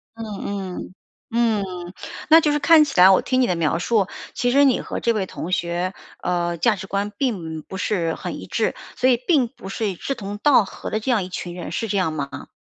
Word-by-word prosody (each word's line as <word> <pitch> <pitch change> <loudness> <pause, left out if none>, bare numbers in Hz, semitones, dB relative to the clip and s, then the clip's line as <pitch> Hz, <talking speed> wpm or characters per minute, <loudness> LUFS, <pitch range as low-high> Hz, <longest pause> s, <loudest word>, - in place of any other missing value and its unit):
嗯 225 - -7 0.6
嗯， - - -9 0.4
嗯， 230 -3 +2 0.7
那 320 +1 +8
就 300 - +2
是 295 - +1
看 310 +2 +7
起 275 -10 -2
来 185 +1 +9
我 190 - +5
听 255 0 +1
你 250 - +3
的 180 - +1
描 165 0 0
述， 200 +1 +1 0.3
其 245 - 0
实 280 +2 +5
你 260 -3 +3
和 - - -5
这 235 - +1
位 205 -3 -1
同 180 -1 -6
学， 175 +1 -1 0.3
呃， 175 -1 -1
价 215 +7 +3
值 195 0 -8
观 200 +2 -2
并 170 - -2
不 190 - -8
是 170 -5 -1
很 - - -6
一 - - -9
致， - - 0 0.2
所 255 - +3
以 245 - +4
并 285 -8 +4
不 190 -4 -11
是 210 +2 -2
一 190 - -4
志 275 +10 -3
同 205 -3 -6
道 265 -4 +5
合 - - -7
的 215 - -1
这 235 +4 -1
样 220 -5 +2
一 180 - -7
群 175 -1 -6
人， 180 - -6
是 225 - -2
这 200 - -1
样 185 -4 +1
吗？ 140 -3 -5
200 Hz, 250 characters per minute, -22 LUFS, 180-245 Hz, 0.7 s, 来